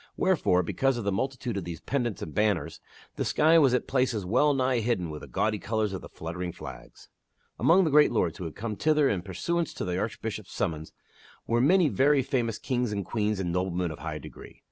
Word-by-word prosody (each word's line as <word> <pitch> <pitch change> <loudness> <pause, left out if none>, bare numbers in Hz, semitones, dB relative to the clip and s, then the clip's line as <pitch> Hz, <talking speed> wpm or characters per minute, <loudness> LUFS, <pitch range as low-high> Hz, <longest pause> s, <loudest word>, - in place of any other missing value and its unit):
Wherefore,, 160 - +2
because 135 +8 0
of 120 - -3
the 100 - 0
multitude 125 +1 -2
of 100 - -3
these 85 -2 -6
pennants 120 -8 -2
and 80 - -7
banners 105 -4 0 0.4
the - - 0
sky 160 +2 +4
was 135 -5 +4
at 125 - -1
places 125 -6 0
well 145 +10 +3
nigh 130 -2 +1
hidden 105 -8 -1
with 75 - -7
the - - -9
gaudy 105 -1 0
colors 105 +1 -1
of 95 - -5
the - - -11
fluttering 85 +2 -5
flags. - - -11 0.5
Among 185 +4 +5
the 160 - +1
great 150 +1 +6
lords 90 -7 0
who 90 - -5
had 80 - -6
come 110 0 -4
thither 150 +3 +3
in 95 -7 0
pursuance 165 - -2
to - - -3
the 90 0 -1
Archbishop's 105 -1 -4
summons 80 -3 -3 0.5
were 120 +1 +1
many 175 +5 +5
very 140 0 +3
famous 120 -4 -1
kings 125 -3 -1
and 100 -2 -3
queens 105 -1 -1
and 90 -3 -2
noblemen 90 -1 -1
of 80 - -9
high - - -4
degree. - - -12
110 Hz, 210 wpm, -28 LUFS, 90-135 Hz, 0.5 s, great